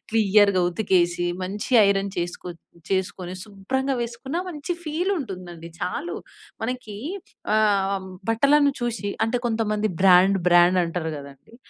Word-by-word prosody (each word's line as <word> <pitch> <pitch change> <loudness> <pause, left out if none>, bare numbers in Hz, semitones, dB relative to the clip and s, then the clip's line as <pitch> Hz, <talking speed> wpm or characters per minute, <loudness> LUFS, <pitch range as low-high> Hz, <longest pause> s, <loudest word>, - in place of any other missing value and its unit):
క్లియర్‌గా 205 -3 +4
ఉతికేసి 175 -2 +1 0.2
మంచి 205 +6 -5 0.2
ఐరన్ 195 0 +1
చేసుకో 175 +1 -4 0.4
చేసుకొని 185 -1 -2
శుభ్రంగా 260 +7 -2
వేసుకున్న 240 +6 -5
మంచి 310 +1 -4
ఫీల్ 335 +5 -1
ఉంటుందండి. 180 - -7
చాలు 310 - -3 0.5
మనకి 250 -3 -4 0.6
ఆ! - - +4 0.7
బట్టలను 280 +5 +4
చూసి 235 -4 -2 0.2
అంటే 235 +2 0
కొంతమంది 215 -2 0
బ్రాండ్, 190 +1 +6
బ్రాండ్ 175 +1 +5
అంటారు 165 -1 -3
కదండీ! 140 - -13
200 Hz, 115 wpm, -24 LUFS, 180-240 Hz, 0.7 s, బ్రాండ్